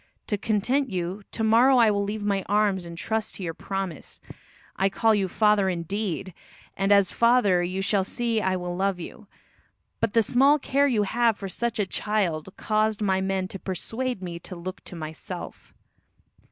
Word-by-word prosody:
To 210 - 0
content 230 +6 0
you, 185 +1 -3
to 225 - -3
morrow 240 +4 +5
I 230 -3 +5
will 200 0 0
leave 205 +1 -4
my 200 -1 +1
arms 205 -3 +2
and 170 0 -9
trust 220 +3 -2
to 195 - -7
your 165 -2 -3
promise. 195 -3 -5 0.6
I 195 +1 +2
call 225 +3 +2
you 200 -2 +1
father 210 0 +3
indeed, 185 +1 -3 0.4
and 195 +2 0
as 200 -2 +5
a - - -12
father 230 -6 +4
you 185 +2 -2
shall 200 -1 +2
see 230 +2 -1
I 190 -2 +1
will 180 -1 -4
love 190 0 0
you; 190 +4 -9 0.7
but 225 -2 0
the 230 - +4
small 270 +7 +4
care 280 0 +2
you 225 -6 +2
have 230 +1 +2
for 195 - -5
such 235 +4 -2
a 205 - +1
child 190 -5 -1
caused 215 0 0
my 190 -2 +1
men 190 -1 -1
to 195 - -7
persuade 225 +5 -4
me 170 -1 -5
to 180 - -8
look 180 +1 -7
to - - -9
myself." 155 -1 -7
200 Hz, 185 wpm, -25 LUFS, 185-220 Hz, 0.7 s, morrow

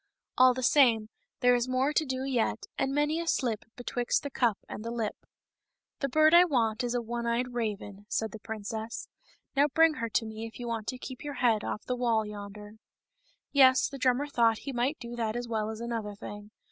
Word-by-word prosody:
All 255 0 +6
the 255 - -3
same, 235 -6 +4 0.3
there 245 -1 +5
is 245 +1 +1
more 260 +3 +1
to 310 - +2
do 260 -1 -3
yet, 250 -4 -1
and 270 - 0
many 295 +3 +1
a 335 - -4
slip 235 -8 0
betwixt 245 0 -1
the 285 - -5
cup 235 -5 +1
and 215 - -7
the 230 - -4
lip. 230 -3 -2 0.9
"The 275 - -1
bird 310 +4 +5
I 345 +1 +9
want 245 -8 +1
is 240 0 -1
the 245 -1 -1
one 235 +1 -3
eyed 245 +2 -1
raven," 205 -3 -4
said 220 -1 -1
the 220 - -9
princess; 220 +1 -5 0.2
" - - -36
Now 285 +2 +5
bring 320 +3 +4
her 230 - -1
to 225 - 0
me 220 +1 -6
if 225 - -13
you 240 - -5
want 225 -2 -3
to 255 - -3
keep 260 +1 -8
your 290 -1 -5
head 230 -4 +2
off 215 - -4
of - - -28
the 250 - -1
wall 230 -3 +1
yonder." 210 0 -9 0.7
Yes; 260 -2 +6
the 275 - -8
drummer 255 +2 +2
thought 230 -6 +2
he 275 - -4
might 255 +5 0
do 235 0 -7
that 225 -1 -1
as 240 0 -3
well 220 -2 -1
as 220 0 -6
another 230 -3 -4
thing. 205 +1 -9
240 Hz, 225 wpm, -29 LUFS, 220-260 Hz, 0.9 s, I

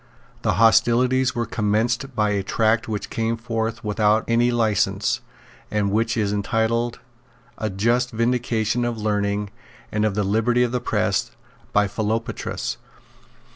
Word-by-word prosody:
The - - +1
hostilities 120 +4 +3
were 120 -1 0
commenced 115 +4 -1
by 105 -2 +2
a 100 -1 0
tract 110 +3 +1
which 105 -2 -4
came 115 0 -1
forth 115 -1 -3
without 105 +1 +2
any 120 +1 +3
license, 115 -4 +1 0.5
and 105 -2 0
which 115 +2 +1
is 105 -2 0
entitled 115 +3 0 0.6
A 110 - -1
Just 120 +6 +1
Vindication 115 0 0
of 120 -1 -2
Learning 105 -1 -1 0.4
and 105 0 0
of 105 -2 +1
the 105 - +1
Liberty 115 +5 +2
of 120 - 0
the 125 -1 -1
Press, - - 0 0.4
by 105 0 +3
Philopatris. 110 +3 -3
110 Hz, 135 wpm, -23 LUFS, 105-120 Hz, 0.6 s, hostilities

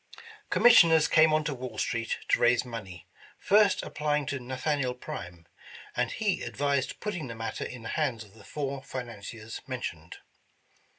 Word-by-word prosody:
Commissioners 165 -9 +7
came 155 0 +5
on 155 0 +2
to 150 - -2
Wall 125 -4 -7
street 115 0 -1
to - - +4
raise 120 +1 +4
money, 100 -8 -8 0.3
first 205 -1 +4
applying 150 -1 -1
to 140 +1 -3
Nathaniel 130 +1 -1
Prime, 90 -8 -8 0.5
and - - +1
he 210 -4 -1
advised 140 -1 -1
put 210 - -3
ting 165 -8 -5
the 115 - -7
matter 115 0 -4
in 125 -2 -8
the - - -5
hands 130 -8 -1
of 100 -2 -18
the 110 -2 -16
four 140 0 -4
financiers 115 -4 -7
men 130 -2 -4
tioned. 80 -4 -6
130 Hz, 165 wpm, -29 LUFS, 115-150 Hz, 0.5 s, Commissioners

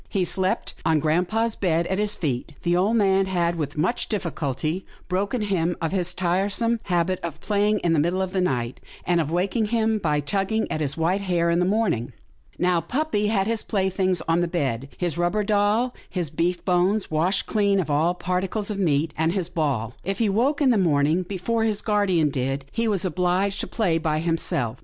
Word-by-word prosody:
He 190 -3 0
slept 185 +2 -1
on 160 -1 +3
grampa' 175 +8 +1
s 230 -1 0
bed 170 -3 +1
at 190 +2 -1
his 210 0 +1
feet. 145 -3 -3
The 175 0 +2
old 195 +6 +2
man 195 -3 +3
had, 175 -2 0
with 150 -2 -4
much 180 +10 0
difficulty, 165 - -2 0.2
broken 200 +5 -1
him 175 -4 0
of 165 -2 -2
his 180 -2 0
tiresome 200 +6 +1
habit 180 0 0
of 170 -3 -5
playing 210 0 +1
in 170 -2 +2
the 160 - +3
middle 175 +5 +1
of 185 - -4
the 190 -1 0
night, 125 -8 -1 0.3
and 175 -1 +2
of 150 - -3
waking 195 +6 0
him 220 0 +1
by 150 -5 +1
tugging 195 +9 0
at 155 - -2
his 145 0 -2
white 175 +5 +1
hair 175 -3 +1
in 170 - +2
the 180 - +2
morning. 190 - 0 0.4
Now, 180 -1 +2
puppy 240 - -1
had 200 -3 +1
his 225 0 0
playthings 190 -3 0
on 165 +1 +2
the 175 - +1
bed 135 -7 -2
— - - -24
his 175 -2 -2
rubber 175 +5 +1
doll, 210 +4 +2 0.2
his 175 -6 -2
beef 175 +3 -1
bones 185 +3 +1
washed 175 +6 +1
clean 200 -2 +2
of 160 -5 -1
all 160 +5 +2
particles 190 +4 -2
of 200 - -4
meat, 155 -3 +1
and 160 +2 +1
his 185 -3 -2
ball. 135 -9 -1
If 195 +1 -2
he 220 -1 +1
woke 270 +9 +1
in 260 - +5
the 225 - +3
morning 155 -1 +2
before 200 +5 -2
his 215 -2 0
guardian 195 -8 +2
did, 135 +1 -2
he 230 0 -1
was 200 -3 0
obliged 185 +3 0
to - - -2
play 180 -8 0
by 155 -1 0
himself. 155 -7 -1
180 Hz, 205 wpm, -24 LUFS, 165-205 Hz, 0.4 s, in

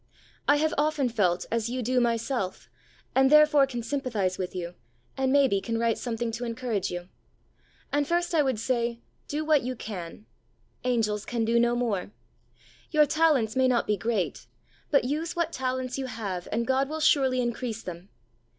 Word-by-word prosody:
I - - +6
have 310 +1 +1
often 295 -3 +1
felt 185 -6 +1
as 230 0 0
you 250 0 -3
do 250 +2 +2
myself, 230 -4 -1 0.5
and 265 0 +4
therefore 300 -1 +6
can 240 -3 -5
sympathise 230 -8 -1
with 185 0 -4
you, 175 -1 -4 0.4
and 265 -1 0
may 280 0 +5
be 200 -5 0
can 230 +1 -2
write 230 0 +1
something 235 -1 -2
to 235 +2 -5
encourage 230 -4 -2
you. 175 0 -6 0.8
And 290 -1 +1
first 345 +1 0
I 320 - +4
would 260 -6 0
say, 235 0 -1 0.2
do 305 +2 -2
what 305 -3 +4
you 255 +1 -3
can, 200 -3 -7 0.3
" - - -40
Angels 215 -3 0
can 235 -2 -1
do 235 +1 +3
no 240 0 +3
more." 225 -7 -1 0.8
Your 305 -1 +5
talents 290 -8 +2
may 260 0 +4
not 245 -2 +2
be 210 - +1
great, 205 -1 -2 0.4
but 280 - +4
use 310 +7 -2
what 335 -1 -1
talents 255 0 -2
you 265 - -3
have 200 -7 -5
and 235 +2 0
God 265 +2 +1
will 315 +1 -3
surely 270 -4 +3
increase 240 -2 -2
them. 180 +2 -8
245 Hz, 180 wpm, -27 LUFS, 220-275 Hz, 0.8 s, I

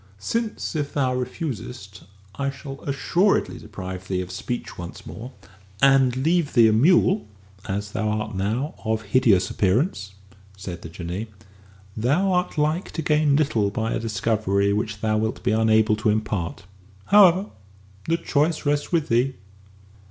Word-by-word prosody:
"Since 220 - -3
if 145 -2 -3
thou 130 -3 +1
refusest 125 - -5 0.3
I 140 0 -2
shall 135 0 -8
assuredly 175 +8 +1
deprive 95 0 -8
thee 95 -1 -1
of 90 0 -7
speech 120 +6 -5
once 85 0 -9
more 120 +4 -8 0.5
and 135 -2 +4
leave 160 +3 +1
thee 115 -3 +6
a - - +2
mule, 180 - +4 0.4
as 100 +1 -3
thou 110 0 -1
art 110 +1 -2
now, 110 +10 -2
of 110 0 -1
hideous 105 -4 +3
appearance," 100 - 0 0.4
said 90 -3 -7
the 80 - -8
Jinnee, 90 +6 -5 0.7
"thou 145 - +1
art 180 -2 0
like 155 +5 0
to 160 - -3
gain 150 -1 +3
little 120 -9 +2
by 110 +2 -2
a - - -1
discovery 105 -2 0
which 105 0 -3
thou 110 -1 +1
wilt 110 +1 -2
be - - +1
unable 110 0 +3
to 110 0 +1
impart. 105 -4 -2 0.4
However, 195 -1 +5 0.6
the 165 +1 +2
choice 155 0 0
rests 145 0 0
with 165 -4 +1
thee." 125 +3 +1
115 Hz, 150 wpm, -23 LUFS, 100-150 Hz, 0.7 s, thee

